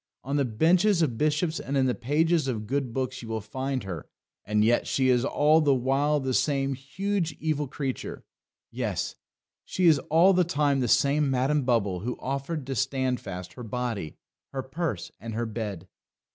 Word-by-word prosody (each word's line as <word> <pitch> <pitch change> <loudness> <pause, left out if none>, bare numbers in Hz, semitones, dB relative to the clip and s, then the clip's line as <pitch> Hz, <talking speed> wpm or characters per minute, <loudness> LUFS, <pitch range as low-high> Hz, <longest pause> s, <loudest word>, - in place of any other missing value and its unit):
On 140 +2 -2
the 140 -1 +2
benches 170 - +3
of 130 -7 0
bishops 155 +2 +1
and 140 +1 -2
in 135 - +3
the 125 - +2
pages 155 +4 +1
of 110 -5 -2
good 135 +1 -1
books 130 +1 -3
you 115 - -9
will 110 0 -1
find 130 +3 -3
her, 90 -5 -6 0.4
and 105 +1 +2
yet 120 +1 +2
she 130 -1 +2
is 125 -1 +3
all 150 +3 +4
the 145 -3 +4
while 135 +4 +1
the 130 -1 -2
same 135 0 +1
huge 165 +6 -2
evil 150 -2 -1
creature." 135 -1 -5 0.5
Yes; - - -2 0.5
she 185 - -1
is 160 -4 +6
all 170 +5 +6
the 180 0 +4
time 145 -4 +1
the 125 - +1
same 140 +4 +3
Madam 135 +2 +1
Bubble 105 -7 +1
who 120 +7 -4
offered 140 +3 -3
to 135 - -3
Standfast 125 -9 -2
her 125 - -9
body, 115 -7 -4 0.3
her 135 -1 -3
purse, 135 - -3
and 115 +2 -6
her 120 +1 -1
bed. 105 -5 -5
135 Hz, 180 wpm, -27 LUFS, 120-150 Hz, 0.5 s, is